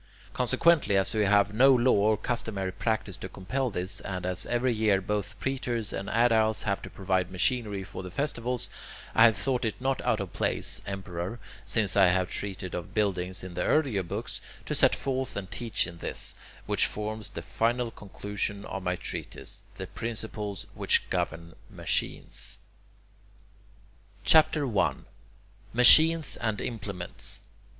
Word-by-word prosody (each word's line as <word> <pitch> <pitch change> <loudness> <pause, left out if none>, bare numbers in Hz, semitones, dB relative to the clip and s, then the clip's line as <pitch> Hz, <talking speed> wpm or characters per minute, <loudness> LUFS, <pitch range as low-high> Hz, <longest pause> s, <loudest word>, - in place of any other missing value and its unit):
Consequently, 160 -12 +3
as 95 - +1
we 105 -2 +2
have 100 0 +3
no 130 +4 +6
law 125 +1 +4
or 105 +1 +3
customary 100 -6 -2
practice 100 0 -2
to 95 - -7
compel 125 +9 -2
this, 95 -2 -3
and 95 -2 -5
as 90 -1 -2
every 120 +1 +1
year 105 -3 +2
both 105 +2 -3
praetors 120 -5 -2
and 100 - -4
aediles 110 -1 +3
have 100 -2 -1
to - - -8
provide 95 -2 -1
machinery 105 +1 0
for 95 - -7
the 90 - -7
festivals, 125 0 -2 0.5
I 115 - +7
have 110 -4 +5
thought 125 +5 0
it 110 -2 -2
not 135 +1 0
out 110 - +1
of 100 -3 -5
place, - - 0
Emperor, 95 +1 -4 0.3
since 105 -5 +1
I 95 -2 +6
have 90 0 +1
treated 95 -2 -4
of 85 - -6
buildings 95 -4 0
in 90 -1 -7
the 90 - -3
earlier 135 - +2
books, 85 - -5 0.2
to - - -3
set - - +4
forth 130 -1 -2
and 95 -2 -5
teach 115 -4 -1
in 85 -1 -9
this, - - -2 0.3
which - - +3
forms 105 0 -4
the 110 - -7
final 120 +1 0
conclusion 100 0 -5
of 95 - -5
my 90 0 -1
treatise, - - -6
the - - -6
principles 105 -3 -5
which - - +2
govern 85 +1 -2 0.2
machines. - - -2 1.7
CHAPTER 155 +6 +5
I - - +2 0.8
MACHINES 155 +6 +7
AND 110 -3 -1
IMPLEMENTS 100 -6 -4
1. - - -29
105 Hz, 155 wpm, -28 LUFS, 95-120 Hz, 1.7 s, I